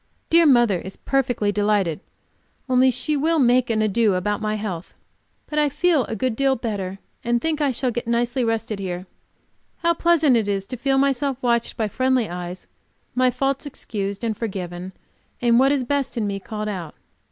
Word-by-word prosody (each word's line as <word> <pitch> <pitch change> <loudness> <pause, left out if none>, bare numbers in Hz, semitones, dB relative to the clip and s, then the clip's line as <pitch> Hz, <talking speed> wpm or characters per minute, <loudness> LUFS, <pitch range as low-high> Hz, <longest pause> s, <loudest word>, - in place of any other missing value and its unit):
Dear 335 0 +6
mother 240 -9 +4
is 190 +2 -7
perfectly 245 -6 0
delighted, 205 -5 +1 0.7
only 255 0 +4
she 255 +5 0
will 320 +3 +2
make 250 -2 +3
an 215 -1 +1
ado 215 -1 +2
about 205 +4 -1
my 215 0 -1
health. 190 -5 -5 0.5
But 300 - -2
I 295 -1 +3
feel 300 -1 +2
a 225 - -4
good 235 +2 -1
deal 270 +1 +2
better, 200 -5 -4 0.3
and 240 0 +1
think 315 +2 -1
I 290 - +3
shall 255 0 -1
get 240 0 -4
nicely 240 +2 +1
rested 225 -2 -1
here. 180 -1 -4 0.8
How 340 0 +4
pleasant 325 -5 +3
it 220 -3 +1
is 195 -1 -1
to 255 - -4
feel 270 +2 +1
myself 275 -1 +1
watched 235 -1 +1
by 220 - 0
friendly 255 +1 +1
eyes, 180 +1 -6 0.5
my 255 0 +3
faults 270 +3 -1
excused 200 -6 -4
and 225 -2 -1
forgiven, 185 -4 -5 0.5
and 240 -1 +4
what 270 +1 +4
is 280 -3 +1
best 275 0 -1
in 220 - 0
me 200 -1 -2
called 215 +1 -5
out. 180 -7 -5
235 Hz, 185 wpm, -22 LUFS, 205-270 Hz, 0.8 s, Dear